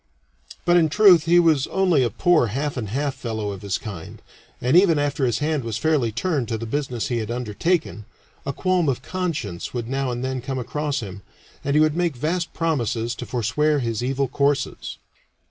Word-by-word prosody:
But 175 0 +5
in 160 -2 +4
truth 180 -3 +6
he 175 +1 +5
was 160 -5 +3
only 185 -7 +2
a 120 - +2
poor 170 -5 +3
half 140 +6 -2
and 115 -6 -4
half 140 +5 -1
fellow 110 -4 -4
of 95 -1 -8
his 100 -2 -1
kind, 95 -7 -8 0.4
and 125 +5 +1
even 180 -3 +6
after 145 -2 0
his 120 - 0
hand 150 -2 -1
was 115 -2 -3
fairly 145 -6 +1
turned 140 - -1
to 115 - -2
the 115 - -5
business 125 -1 -2
he 120 -2 0
had 110 -1 -4
undertaken, 120 - -1 0.4
a 140 - -2
qualm 180 +1 +1
of 130 -1 -2
conscience 150 - -4
would 120 -2 -3
now 135 +1 -1
and 120 +1 -3
then 130 -1 -3
come 135 +1 -4
across 145 +3 -2
him, 100 -2 -8 0.4
and 140 +1 0
he - - +5
would 155 0 +3
make 170 -4 0
vast 165 +6 -2
promises 120 -8 -1
to - - -7
forswear 130 +6 +1
his 115 -4 -2
evil 135 +2 0
courses. 140 +2 -1
135 Hz, 195 wpm, -23 LUFS, 115-155 Hz, 0.4 s, truth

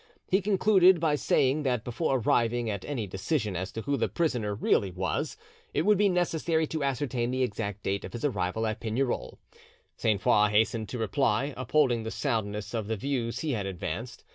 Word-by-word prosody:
He 190 +2 +4
concluded 190 -2 +5
by 160 -2 +2
saying 140 0 +2
that 125 -5 0
before 135 +3 0
arriving 120 -1 +1
at 100 -3 -4
any 130 -7 -3
decision 105 - -2
as 95 +2 -3
to 110 - -5
who 140 0 0
the 115 - 0
prisoner 120 -11 -1
really 100 -1 +2
was, 90 -2 -2 0.4
it - - +2
would 210 +1 +4
be 205 -1 +4
necessary 165 -2 +1
to 155 -1 -3
ascertain 130 -3 -1
the 130 +1 0
exact 105 -3 -3
date 100 +1 -1
of - - -8
his 120 +4 -3
arrival 100 -3 -1
at 110 0 -2
Pignerol. 120 +3 -2 0.6
Sainte 105 -3 +1
Foix 105 +3 +4
hastened 110 +1 +1
to 125 - -4
reply, 120 +4 0
upholding 130 -2 +2
the 110 - -4
soundness 105 -2 -2
of 110 -3 -2
the 110 0 -2
views 120 0 -2
he 155 - -1
had 105 -6 -2
advanced. 95 +6 -5
120 Hz, 190 wpm, -28 LUFS, 105-145 Hz, 0.6 s, concluded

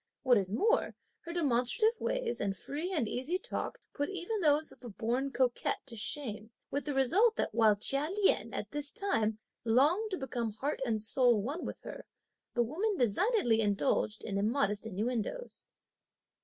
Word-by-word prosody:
What 245 -4 +5
is 190 -1 -3
more, 445 - +1 0.3
her 335 - -5
demonstrative 335 - +2
ways - - -1
and 195 -2 -1
free 310 - -4
and 300 - 0
easy 260 +11 -1
talk - - -4
put 285 0 -2
even 395 +3 -3
those 300 -1 +3
of - - -17
a 240 - -7
born 240 +6 -1
coquette 255 -2 0
to 245 -4 -7
shame, 220 -2 -2 0.2
with 285 -1 -2
the 290 - -2
result 385 - +4
that - - -1
while 220 -2 +5
Chia 275 +8 +1
Lien, 395 +1 +2
at - - -5
this 295 0 -2
time, 225 - 0 0.3
longed 295 - +3
to 375 - -2
become 240 -5 -3
heart 275 +8 -3
and 220 -2 -1
soul 240 0 +4
one 280 - -3
with - - -7
her, - - -9 0.5
the 240 - +3
woman 375 - -1
designedly 245 - +2
indulged 210 +1 +1
in 200 -2 -2
immodest 210 -1 +1
innuendoes. 235 - -3
265 Hz, 170 wpm, -32 LUFS, 225-350 Hz, 0.5 s, What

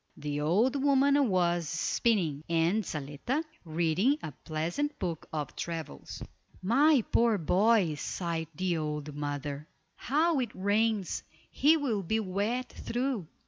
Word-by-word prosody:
The 145 0 -3
old 225 - +2
woman 280 -1 +4
was 175 -3 +1
spinning, 165 -3 0
and 170 +6 +2
Zaletta 155 - -3 0.2
reading 170 - +2
a - - -4
pleasant 165 - -3
book 170 -4 -4
of 150 -3 -4
travels. 160 - -6 0.4
"My 270 +5 +4
poor 230 -2 +4
boy," 190 +1 +3
sighed 165 -2 -3
the 180 0 0
old 150 -1 -3
mother. 145 0 -4 0.3
"How 310 +3 +2
it 240 -4 -3
rains; 205 +1 +1 0.3
he 310 +3 +4
will 245 -9 -1
be 220 +5 0
wet 215 +5 -1
through. 245 - -2
185 Hz, 125 wpm, -30 LUFS, 160-240 Hz, 0.4 s, woman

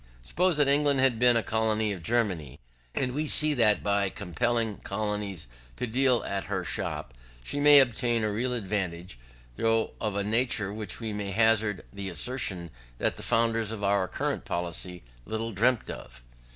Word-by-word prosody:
Suppose 180 - +1
that 145 -2 +3
England 140 0 +3
had 130 -4 +2
been 120 -1 +5
a 115 - 0
colony 110 -1 0
of 90 - -8
Germany, 90 - -1 0.4
and 125 -2 0
we 150 +3 +1
see 150 +1 +7
that 110 -7 +3
by 100 -1 +1
compelling 115 +4 -1
colonies 105 -4 -3 0.3
to - - -3
deal 125 +1 +1
at 100 -1 -3
her - - -3
shop, - - -4 0.3
she 145 - -3
may 145 0 +8
obtain 120 -3 +1
a 105 - 0
real 125 +4 -1
advantage, 95 - -4 0.4
though 115 0 +1
of 105 -3 -2
a 100 - 0
nature 110 -2 0
which 105 -4 -4
we 110 -2 -4
may 105 -1 -4
hazard 110 -1 +1
the 100 -1 -5
assertion 90 - -2 0.3
that - - 0
the - - -9
founders 115 -1 +1
of 110 -2 -6
our 100 -1 +1
colonial - - -3
policy 90 +1 -5 0.2
little 115 +1 -3
dreamt 115 +4 +1
of. - - -11
110 Hz, 170 wpm, -27 LUFS, 100-120 Hz, 0.4 s, may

